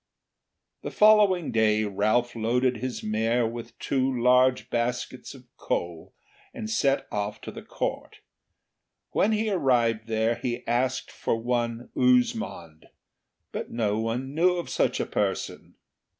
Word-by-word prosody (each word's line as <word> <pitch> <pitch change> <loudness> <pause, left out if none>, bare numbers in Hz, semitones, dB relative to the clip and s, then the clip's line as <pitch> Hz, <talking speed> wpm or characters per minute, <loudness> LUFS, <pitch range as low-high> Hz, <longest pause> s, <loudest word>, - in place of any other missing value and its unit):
The - - -5
following 210 -5 +4
day 110 -1 +2
Ralph 110 +4 0
loaded 125 +2 +1
his 125 +2 -5
mare 115 +3 +1
with 115 0 -6
two 135 -1 0
large 125 +1 +3
baskets 125 +3 -3
of 130 - -14
coal 85 -2 -4 0.4
and 225 -5 -5
set 140 -10 +1
off 105 0 -3
to - - -8
Court. - - -5 0.9
When 210 - +2
he 215 0 0
arrived 120 - +1
there 110 +1 0
he 120 0 -4
asked 125 +2 -1
for - - -1
one 120 0 -2
Uzmond, 230 - 0 0.6
but - - -5
no 110 -2 -1
one 120 +4 -3
knew 180 +3 +3
of 175 - -5
such - - +1
a - - 0
person. - - -3
120 Hz, 130 wpm, -26 LUFS, 110-135 Hz, 0.9 s, following